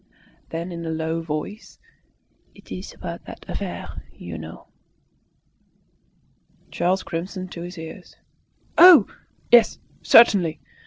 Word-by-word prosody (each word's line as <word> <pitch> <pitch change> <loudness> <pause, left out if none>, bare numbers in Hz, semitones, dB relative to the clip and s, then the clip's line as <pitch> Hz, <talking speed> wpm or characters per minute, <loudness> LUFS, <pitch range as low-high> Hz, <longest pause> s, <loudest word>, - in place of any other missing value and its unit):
Then 170 +2 -5
in 170 -1 -6
a 165 - -4
low 160 +1 -2
voice, 160 +7 -6 0.8
"It's - - -9
about - - -8
that - - -11
affair - - -6
you 85 -2 -9
know." 80 0 -10 2.0
Charles 180 +3 0
crimsoned 185 +2 -6
to 170 - -8
his 175 +1 -8
ears. 160 +3 -10 0.6
"Oh, 345 - +9 0.5
yes! 240 -1 +6 0.2
certainly." 195 -8 +5
170 Hz, 105 wpm, -23 LUFS, 160-190 Hz, 2.0 s, Oh